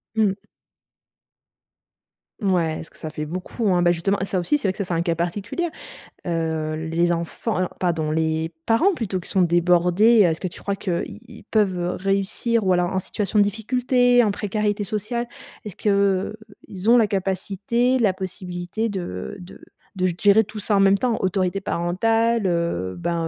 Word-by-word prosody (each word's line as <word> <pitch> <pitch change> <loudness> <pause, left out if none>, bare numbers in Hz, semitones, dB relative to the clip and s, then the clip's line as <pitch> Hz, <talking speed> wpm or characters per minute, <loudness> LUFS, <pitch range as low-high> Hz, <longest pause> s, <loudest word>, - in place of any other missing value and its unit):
Mmh. 210 -3 +2 2.0
Mouais, 180 -7 +1
parce 165 - -9
que - - -22
ça 155 - -6
fait 150 0 -4
beaucoup, 185 +7 -3
hein. 175 0 +2
Bah 175 - +5
justement 175 +4 0
ça 190 -1 -1
aussi 180 +12 +1
c'est 245 - -2
vrai - - +2
que - - -15
ça - - +1
c'est 180 - -4
un 165 - 0
cas 170 -1 +1
particulier. 200 - -2 0.6
Heu, 160 -2 -1
les 170 +1 +2
enfants, 170 +6 -2
heu, - - +2
non 180 - -2
pardon, 165 -4 0
les 160 +1 -1
parents 275 +13 +3
plutôt 205 - -3
qui 180 - -10
sont 190 - +2
débordés, 180 +6 +4
heu, - - +5
est-ce 160 -1 -1
que 185 - -3
tu 175 - -11
crois 200 - -2
que, 180 -4 -2
i - - -10
ils - - -13
peuvent 185 -5 0
réussir 195 +4 0
ou 185 - +3
alors 180 0 +1
en 190 - +1
situation 210 +2 -1
de - - +7
difficulté, 245 +4 +2
en 210 - +2
précarité 205 0 -1
sociale, 215 +4 -3 0.4
est-ce 205 -4 -7
qu'ils 200 0 -1
ont 240 - +7
la 225 -3 +4
capacité, 200 +6 0
la 205 -5 +3
possibilité 185 +2 -4
de 175 - -5
de 180 0 -12 0.4
de 185 - +1
g 180 -2 0
gérer 205 +2 +6
tout 215 +1 -9
ça 205 +1 0
en - - +3
même 195 0 +5
temps, 240 +2 0
autorité 190 0 0
parentale, 225 +6 +1
heu, 170 - -1
ben 165 - -1
190 Hz, 185 wpm, -23 LUFS, 175-215 Hz, 2.0 s, de